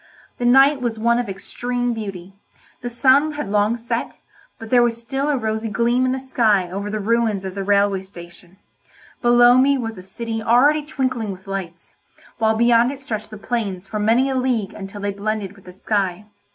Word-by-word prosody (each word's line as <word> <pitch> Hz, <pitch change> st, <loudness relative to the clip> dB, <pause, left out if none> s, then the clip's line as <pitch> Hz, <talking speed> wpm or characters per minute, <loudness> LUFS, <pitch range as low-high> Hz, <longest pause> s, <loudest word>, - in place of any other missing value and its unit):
The 245 Hz, -, +1 dB
night 270 Hz, +2 st, +5 dB
was 235 Hz, -2 st, -2 dB
one 235 Hz, +2 st, +2 dB
of 240 Hz, -4 st, -3 dB
extreme 245 Hz, +5 st, -3 dB
beauty; 195 Hz, -4 st, -7 dB, 0.5 s
the 245 Hz, -, -4 dB
sun 275 Hz, +5 st, +3 dB
had 295 Hz, -9 st, -5 dB
long 210 Hz, +3 st, +2 dB
set, 235 Hz, 0 st, -4 dB, 0.4 s
but 225 Hz, -2 st, -10 dB
there 245 Hz, -1 st, +6 dB
was 235 Hz, -1 st, +1 dB
still 270 Hz, +5 st, -3 dB
a 290 Hz, -, +1 dB
rosy 220 Hz, -1 st, -2 dB
gleam 235 Hz, +4 st, +1 dB
in -, -, +1 dB
the 265 Hz, -, -2 dB
sky 215 Hz, -8 st, +1 dB
over 200 Hz, +2 st, -4 dB
the 215 Hz, +1 st, -3 dB
ruins 215 Hz, -2 st, 0 dB
of 190 Hz, -, -5 dB
the 195 Hz, 0 st, -4 dB
railway 200 Hz, -1 st, +2 dB
station; 175 Hz, -1 st, -14 dB, 0.6 s
below 240 Hz, +1 st, +6 dB
me 275 Hz, +1 st, +4 dB
was 225 Hz, -3 st, -4 dB
the 185 Hz, -, -11 dB
city 225 Hz, +4 st, -5 dB
already 280 Hz, +7 st, +3 dB
twinkling 255 Hz, -7 st, -2 dB
with 190 Hz, 0 st, -11 dB
lights, 185 Hz, -4 st, -7 dB, 0.5 s
while 220 Hz, -1 st, +2 dB
beyond 235 Hz, +1 st, +4 dB
it 280 Hz, -, -8 dB
stretched 215 Hz, -6 st, -5 dB
the 215 Hz, -, -9 dB
plains 205 Hz, -4 st, -3 dB
for 215 Hz, +2 st, -5 dB
many 230 Hz, +5 st, +3 dB
a 270 Hz, -, -1 dB
league 250 Hz, -6 st, -1 dB
until 195 Hz, +1 st, -8 dB
they 200 Hz, 0 st, -1 dB
blended 205 Hz, -1 st, -3 dB
with 195 Hz, -, -19 dB
the 180 Hz, -, -11 dB
sky. 195 Hz, 0 st, -2 dB
225 Hz, 195 wpm, -21 LUFS, 200-245 Hz, 0.6 s, there